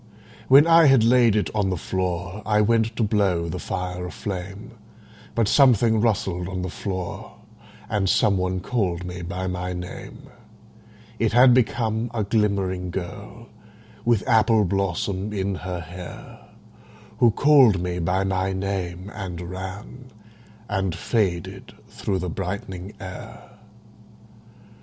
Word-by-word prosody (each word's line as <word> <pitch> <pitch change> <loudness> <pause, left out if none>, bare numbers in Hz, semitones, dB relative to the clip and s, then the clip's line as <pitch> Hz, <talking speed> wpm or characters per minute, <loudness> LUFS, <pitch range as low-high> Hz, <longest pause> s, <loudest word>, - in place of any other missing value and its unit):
When 140 +5 +8
I 165 0 +6
had 135 -4 +5
laid 120 -2 +4
it 105 - 0
on 105 -3 +1
the 95 - -1
floor 90 +3 -3
I 105 0 +2
went 110 +1 +2
to 115 - 0
blow 100 -5 +1
the 80 - -4
fire 90 0 -4
aflame, 100 +4 -6 0.6
But 115 -3 +2
something 115 -4 +4
rustled 95 -5 0
on 90 -1 -4
the 90 - -4
floor, 95 -3 -5 0.5
And 95 -2 0
some 105 -1 +3
one 95 0 -1
called 90 -6 -1
me 90 0 -6
by 90 +2 -4
my 90 0 -3
name: 90 0 -8 1.0
It - - +1
had 125 +1 +7
become 115 -2 +1
a 110 - 0
glimmering 100 -4 0
girl 100 +6 -7 0.5
With 115 -3 +1
apple 110 -2 +4
blossom 95 +2 -1
in 100 -1 -1
her 90 -1 -5
hair 90 +2 -10 0.8
Who 120 - +6
called 130 -5 +5
me 90 0 -3
by 90 +3 0
my 95 0 -1
name 95 -1 -4
and 95 -4 -6
ran 95 +8 -7 0.6
And 95 -4 -1
faded 90 -4 -2
through 95 - -3
the 90 0 -3
brightening 95 +2 -5
air. 90 -1 -10
95 Hz, 135 wpm, -23 LUFS, 90-110 Hz, 1.0 s, When